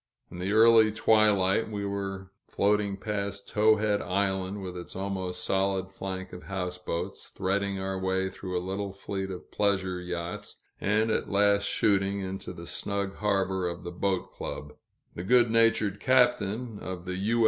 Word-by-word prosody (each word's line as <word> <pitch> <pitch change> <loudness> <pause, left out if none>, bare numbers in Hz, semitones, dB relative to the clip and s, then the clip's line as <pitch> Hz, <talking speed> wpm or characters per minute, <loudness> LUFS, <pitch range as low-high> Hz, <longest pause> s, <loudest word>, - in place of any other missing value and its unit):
In 90 - -8
the 95 +2 -1
early 110 0 +6
twilight 105 -2 +3
we 100 -2 -3
were 95 -1 -4 0.2
floating 100 -1 +1
past 100 -1 -4
Towhead 105 -1 +3
Island, 95 +1 -1
with 90 -1 -5
its 90 -1 -8
almost 95 -1 -3
solid 95 0 0
flank 95 -1 -6
of 90 - -8
houseboats, 90 -3 -4
threading 100 +1 -1
our 95 0 -3
way 95 0 0
through 90 -1 -4
a 90 - -3
little 100 +1 -3
fleet 95 -1 -4
of 90 -1 -8
pleasure 95 -3 0
yachts, 90 -1 -5 0.2
and 110 +2 +1
at - - 0
last 100 0 +4
shooting 100 -1 +2
into 95 0 -5
the - - -9
snug 100 -1 -2
harbor 95 -3 0
of 85 0 -5
the 85 - -5
Boat 95 +1 -1
Club. 75 0 -6 0.4
The - - -6
good 120 +4 +4
natured 115 -3 +3
captain 120 -3 +2
of 90 -1 -6
the 90 0 -3
U. 110 +5 +1
100 Hz, 160 wpm, -28 LUFS, 95-105 Hz, 0.4 s, early